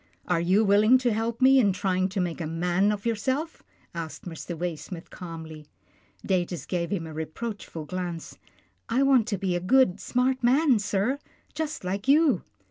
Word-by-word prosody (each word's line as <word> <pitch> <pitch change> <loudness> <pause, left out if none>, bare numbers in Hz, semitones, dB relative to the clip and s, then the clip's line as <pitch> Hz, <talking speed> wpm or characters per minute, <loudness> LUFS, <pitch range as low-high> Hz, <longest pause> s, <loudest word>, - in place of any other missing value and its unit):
" - - -33
Are 165 - +1
you 190 +6 +3
willing 210 +5 +5
to 250 -3 0
help 230 +3 -2
me 265 +1 +7
in 205 -6 +3
trying 185 -1 0
to 195 +1 -3
make 175 -1 -2
a 160 - -2
man 175 +5 +1
of 210 0 -4
yourself?" 260 +8 -1 0.3
asked 165 -2 -6
Mr. 170 0 -6
Waysmith 170 0 -5
calmly. 160 -3 -9 0.6
Datus 180 -2 -1
gave 170 -2 -2
him 175 -4 -2
a 160 - -8
reproachful 160 +1 -6
glance. 175 -1 -5 0.2
" - - -42
I 250 +4 +2
want 265 -5 +4
to 205 - -1
be 185 -1 -1
a - - 0
good, 200 +1 +3
smart 255 +1 0
man, 260 0 +4
sir, 205 +6 0 0.3
just 310 -4 -4
like 195 +5 -3
you." 285 - +4
195 Hz, 180 wpm, -26 LUFS, 175-245 Hz, 0.6 s, me